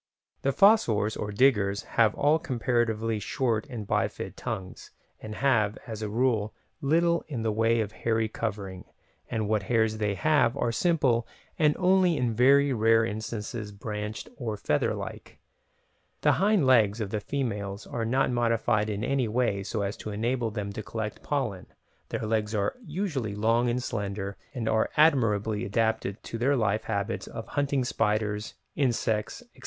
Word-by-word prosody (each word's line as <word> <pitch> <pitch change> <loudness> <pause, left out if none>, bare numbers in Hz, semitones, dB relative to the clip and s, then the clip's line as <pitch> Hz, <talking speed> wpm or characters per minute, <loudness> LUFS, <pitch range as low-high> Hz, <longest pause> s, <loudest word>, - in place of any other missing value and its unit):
The 135 - +1
fossors, 120 - +4
or 105 - -4
"diggers", 100 -4 +2
have 110 -3 +2
all 150 +3 +3
comparatively 120 -6 0
short 115 +2 -1
and 110 -5 -6
bifid - - -1
tongues, 95 -1 -6 0.3
and 110 0 -7
have, 115 -6 +2
as 110 -2 -6
a 105 - -3
rule, 110 -2 0 0.3
little 170 +4 +2
in 125 -7 -4
the 110 - +1
way 115 +1 +2
of 105 -1 -3
hairy 110 0 0
covering, 100 -4 -5 0.4
and 110 -2 -1
what 110 -1 +1
hairs 110 +1 +1
they 105 -2 0
have 145 -1 +2
are 120 - 0
simple 130 -5 +2 0.3
and 150 -2 +4
only 185 -2 +3
in 120 -2 0
very 140 +4 +5
rare 115 0 +4
instances 110 0 -5
branched 105 +1 -5
or 115 -6 -3
feather - - 0
like. - - -8 0.8
The - - +4
hind 200 -6 +3
legs 115 -4 +4
of 105 -3 -3
the 105 - -1
females 105 -5 -3
are 115 - -3
not 130 +4 +1
modified 115 -2 +1
in 105 0 -3
any 130 -1 +1
way 110 -3 0
so 100 +1 -3
as 100 +1 -2
to - - -7
enable 115 +3 -1
them 100 -1 -4
to 110 - -5
collect 110 0 -5
pollen, 130 -10 -2 0.4
their - - -3
legs 110 0 0
are 100 -1 0
usually 150 - -3
long 115 +3 +2
and 125 +1 -1
slender, 100 -4 -3 0.2
and 120 -3 -3
they - - +1
are 110 - +2
admirably 110 -9 +3
adapted 110 -1 -1
to 115 - -6
their 135 +4 +3
life 110 -3 0
habits 100 -3 -2
of - - -8
hunting 140 -2 0
spiders, 105 -2 -1 0.2
insects, 115 - 0
etc. - - -21
115 Hz, 165 wpm, -27 LUFS, 105-130 Hz, 0.8 s, very